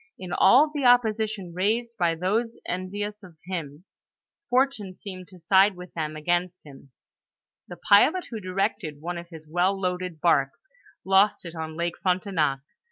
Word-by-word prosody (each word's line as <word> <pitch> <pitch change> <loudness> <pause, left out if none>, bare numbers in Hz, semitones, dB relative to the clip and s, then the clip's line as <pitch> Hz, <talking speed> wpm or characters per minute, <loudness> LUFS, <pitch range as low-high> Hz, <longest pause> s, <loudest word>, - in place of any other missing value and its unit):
In 180 -1 -7
all 275 +10 +5
the 290 -2 -2
opposition 220 -6 +2
raised 225 +6 -1
by 170 -5 +1
those 215 +7 -1
envious 205 +3 -4
of 180 -5 -15
him, 165 -3 -6 0.6
fortune 250 -7 0
seemed 185 -3 -9
to 185 - -14
side 190 +4 +4
with 180 0 -11
them 155 -2 -4
against 175 +3 -2
him; 140 -2 -15 0.8
the - - -9
pilot 310 - +4
who 225 - -4
directed 185 -5 -2
one 175 +3 -4
of 170 0 -11
his 160 -2 -12
well 180 +4 +1
loaded 180 -3 -3
barks, 140 -5 +2 0.5
lost 195 +1 +3
it 170 - -7
on 160 -1 -6
Lake 170 0 -3
Frontenac. 180 -7 0
185 Hz, 155 wpm, -25 LUFS, 170-205 Hz, 0.8 s, all